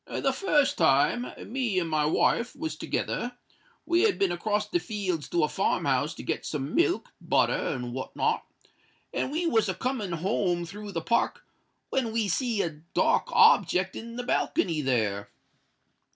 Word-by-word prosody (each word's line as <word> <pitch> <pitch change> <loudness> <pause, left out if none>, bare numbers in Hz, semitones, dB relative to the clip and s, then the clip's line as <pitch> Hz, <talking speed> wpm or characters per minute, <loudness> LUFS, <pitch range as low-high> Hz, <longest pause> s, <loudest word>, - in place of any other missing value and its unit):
The - - 0
fust 300 -8 +2
time, 165 - +3 0.3
me 245 -7 0
and 175 -2 +1
my 155 -2 +1
wife 235 +9 +1
was 320 0 -4
together: 245 0 -3 0.5
we 345 +1 +3
had 425 -2 +3
been 195 -3 +2
across 210 +4 -1
the 350 - 0
fields 195 - -3
to 170 -2 +1
a - - +3
farm - - 0
house - - +1
to - - -8
get - - -2
some 145 +1 -4
milk, 360 +1 +1
butter, - - +2
and 125 -3 -3
what 130 +1 -6
not; - - +1 0.7
and - - -1
we 330 +4 -1
was 225 - +2
a 185 - -1
coming 215 -4 -2
home 175 0 0
through 205 +4 -8
the 165 - -2
Park, 235 +8 0 0.5
when 245 -4 0
we 225 -2 0
see 225 +2 0
a 155 -3 -5
dark - - +3
object 190 - +4
in 230 +1 -7
the 245 - -4
balcony 170 -8 0
there. 105 -7 0
200 Hz, 170 wpm, -27 LUFS, 165-245 Hz, 0.7 s, object